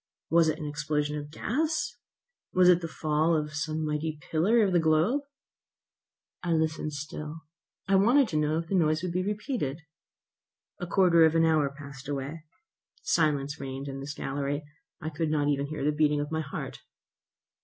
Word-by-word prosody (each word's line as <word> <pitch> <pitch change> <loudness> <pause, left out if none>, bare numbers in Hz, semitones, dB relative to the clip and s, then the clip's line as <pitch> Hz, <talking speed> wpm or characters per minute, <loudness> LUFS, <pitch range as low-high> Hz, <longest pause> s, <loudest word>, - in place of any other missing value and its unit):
Was 165 -1 +5
it 155 - -1
an 155 - -6
explosion 150 0 -1
of 145 -1 -5
gas? 305 - -1 0.6
Was 180 -1 +6
it 180 -1 +5
the 165 - -3
fall 155 +1 +1
of 150 -1 -2
some 155 +1 -2
mighty 155 +1 -2
pillar 210 +9 +4
of 195 -3 +1
the 175 - +5
globe? 165 - +3 1.2
I 175 -1 0
listened 160 -1 0
still. 150 +2 -6 0.5
I 195 - +1
wanted 245 +7 +5
to 155 - -1
know 150 +1 +1
if 165 - -2
the 195 - -4
noise 155 -3 +2
would 180 - -2
be 180 +2 0
repeated. 200 - -3 1.0
A 175 - -4
quarter 175 -2 +5
of 160 0 +4
an 165 0 +5
hour 155 -3 +3
passed 140 -1 -11
away. 145 +3 -4 0.6
Silence 145 -2 +1
reigned 135 +1 -5
in 135 0 -5
this 145 +2 -6
gallery. 140 +2 -2 0.4
I 160 -2 -4
could 155 +1 -1
not 150 -2 +1
hear 140 -1 +1
even 145 0 -3
the 150 - +3
beating 150 -1 +3
of 145 +1 -3
my 160 0 0
heart. 140 - -6
155 Hz, 175 wpm, -28 LUFS, 145-170 Hz, 1.2 s, Was